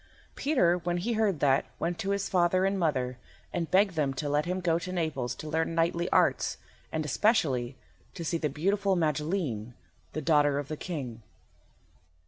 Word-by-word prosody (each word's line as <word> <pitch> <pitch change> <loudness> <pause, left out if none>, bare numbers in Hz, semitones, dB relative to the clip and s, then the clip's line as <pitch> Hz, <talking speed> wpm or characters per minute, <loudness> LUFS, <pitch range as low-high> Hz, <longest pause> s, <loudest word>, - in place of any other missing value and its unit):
Peter, 180 - +2
when 175 0 -1
he 230 +7 -1
heard 215 -7 +1
that, 135 -1 +4
went 170 0 -2
to 195 - -2
his 200 0 0
father 185 +1 +3
and 195 0 0
mother, 130 -7 0 0.3
and 165 -2 -2
begged 195 +1 +4
them 145 -4 0
to 145 +2 -3
let 145 +1 +1
him 180 +1 -1
go 170 -2 +1
to 180 +2 -6
Naples 150 -9 -2
to 155 - -8
learn 160 +1 -1
knightly 170 +1 +1
arts, - - +2 0.3
and, 155 -1 -2
especially, 140 - +1 0.4
to 170 - -5
see 165 +1 0
the 150 - 0
beautiful 195 +7 +1
Magilene, 150 - -1 0.4
the - - -2
daughter 145 -2 +3
of 145 -1 -4
the 155 - -2
King. 130 -11 -5
165 Hz, 175 wpm, -29 LUFS, 145-185 Hz, 0.4 s, that